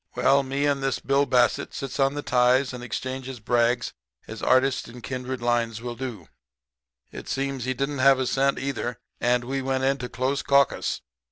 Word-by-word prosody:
"Well, 140 Hz, +1 st, +4 dB
me 135 Hz, +2 st, -1 dB
and 140 Hz, -1 st, +1 dB
this 135 Hz, -1 st, 0 dB
Bill 140 Hz, +1 st, +1 dB
Bassett 125 Hz, -2 st, +2 dB
sits 135 Hz, -1 st, -5 dB
on 135 Hz, +1 st, +2 dB
the 145 Hz, -, -4 dB
ties 125 Hz, +2 st, +3 dB
and 125 Hz, -1 st, -7 dB
exchanges 130 Hz, +1 st, -5 dB
brags 120 Hz, +1 st, +1 dB, 0.3 s
as -, -, -8 dB
artists 130 Hz, +1 st, +2 dB
in 120 Hz, +1 st, -11 dB
kindred 130 Hz, -1 st, -4 dB
lines 120 Hz, -2 st, 0 dB
will 120 Hz, +1 st, -5 dB
do. 120 Hz, -9 st, -6 dB, 0.8 s
It -, -, -9 dB
seems 135 Hz, -2 st, -2 dB
he 130 Hz, 0 st, -1 dB
didn't 140 Hz, +2 st, -2 dB
have 135 Hz, 0 st, +6 dB
a 130 Hz, -, 0 dB
cent, 135 Hz, +2 st, +1 dB
either, 125 Hz, -3 st, -3 dB, 0.2 s
and 120 Hz, 0 st, +2 dB
we 135 Hz, +2 st, -2 dB
went 130 Hz, 0 st, -1 dB
into 135 Hz, -2 st, 0 dB
close 135 Hz, +2 st, -1 dB
caucus. 140 Hz, -1 st, +2 dB
130 Hz, 180 wpm, -25 LUFS, 125-135 Hz, 0.8 s, have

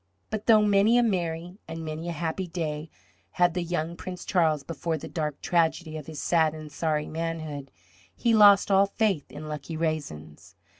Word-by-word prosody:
But 215 Hz, -1 st, -4 dB
though 220 Hz, -2 st, +7 dB
many 205 Hz, +3 st, +4 dB
a 245 Hz, -, +5 dB
merry 175 Hz, -3 st, -2 dB
and 165 Hz, 0 st, -6 dB
many 160 Hz, +2 st, -4 dB
a -, -, -1 dB
happy 170 Hz, +3 st, -3 dB
day 160 Hz, -2 st, -4 dB, 0.4 s
had 175 Hz, -1 st, +3 dB
the 180 Hz, -, -1 dB
young 170 Hz, -1 st, -2 dB
Prince 180 Hz, +1 st, -7 dB
Charles 160 Hz, -6 st, +2 dB
before 165 Hz, +1 st, -3 dB
the -, -, -8 dB
dark 150 Hz, -3 st, -3 dB
tragedy 165 Hz, -1 st, +1 dB
of 155 Hz, -2 st, -7 dB
his 155 Hz, -2 st, -7 dB
sad 160 Hz, -2 st, +2 dB
and 155 Hz, -1 st, -9 dB
sorry 155 Hz, -2 st, -1 dB
manhood, 155 Hz, -4 st, -4 dB, 0.5 s
he 235 Hz, -2 st, +1 dB
lost 205 Hz, -2 st, +7 dB
all 195 Hz, +1 st, +5 dB
faith 200 Hz, -7 st, -1 dB
in 155 Hz, +1 st, -8 dB
lucky 155 Hz, +1 st, -5 dB
raisins. 140 Hz, -, -4 dB
165 Hz, 180 wpm, -27 LUFS, 155-185 Hz, 0.5 s, though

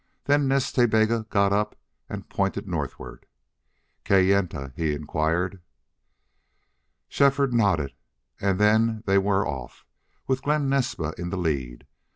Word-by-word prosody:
Then 145 Hz, -1 st, +2 dB
Nas 135 Hz, 0 st, +1 dB
Ta 120 Hz, -2 st, +3 dB
Bega 110 Hz, 0 st, +1 dB
got 100 Hz, -1 st, +2 dB
up 105 Hz, +1 st, 0 dB, 0.3 s
and -, -, -7 dB
pointed -, -, -2 dB
northward. -, -, -6 dB, 0.8 s
"Kayenta?" 95 Hz, -8 st, +2 dB
he 80 Hz, -2 st, -1 dB
inquired. 80 Hz, +5 st, -1 dB, 1.5 s
Shefford 140 Hz, -2 st, +2 dB
nodded 95 Hz, -12 st, +1 dB, 0.5 s
and 95 Hz, -1 st, +1 dB
then 110 Hz, +1 st, +3 dB
they 100 Hz, 0 st, +4 dB
were 100 Hz, 0 st, +1 dB
off, 65 Hz, -4 st, -7 dB, 0.4 s
with 130 Hz, 0 st, 0 dB
Glen 150 Hz, -1 st, +1 dB
Naspa 125 Hz, -, -1 dB
in 90 Hz, 0 st, -4 dB
the 100 Hz, -, -3 dB
lead. 70 Hz, -8 st, -3 dB
100 Hz, 125 wpm, -25 LUFS, 80-120 Hz, 1.5 s, they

